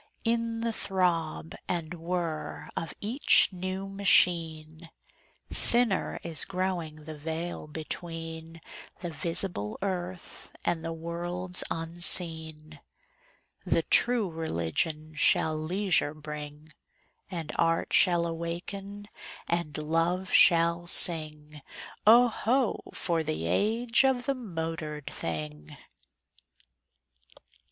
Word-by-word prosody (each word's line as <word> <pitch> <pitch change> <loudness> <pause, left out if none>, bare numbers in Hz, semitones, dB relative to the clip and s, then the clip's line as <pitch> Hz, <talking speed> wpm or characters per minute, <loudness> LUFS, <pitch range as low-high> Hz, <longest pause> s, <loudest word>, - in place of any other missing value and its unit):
In 230 0 -1
the 230 0 -1
throb 165 - -1
and 170 -2 -3
whir 165 -3 -4
of 165 - -3
each 235 +7 +4
new 185 +1 -4
machine 165 -5 +2 0.6
Thinner 235 -5 0
is 165 -3 +1
growing 180 -5 -3
the 155 +1 -8
veil 160 +2 -5
between 165 +1 -7 0.4
The 175 - -3
visible 165 - -2
earth 185 -2 -5
and 165 -2 0
the 165 - -3
worlds 175 +2 -3
unseen. 160 -2 +3 0.8
The - - +1
True 235 -7 +2
Religion 155 - -2
shall 155 +1 +3
leisure 165 -1 0
bring; 150 0 -9 0.6
And 170 -5 -5
Art 165 0 +1
shall 175 -3 +4
awaken 185 +5 -5 0.4
and 170 -4 -2
Love 165 +4 0
shall 170 0 +5
sing: 150 -3 +2 0.5
Oh, 240 +3 +8
ho! 240 +1 0
for 170 -2 -1
the 80 - -3
age 225 - +2
of 260 -2 +1
the 275 - +1
motored 165 - -5
thing! 75 - -6
170 Hz, 95 wpm, -28 LUFS, 155-185 Hz, 0.8 s, Oh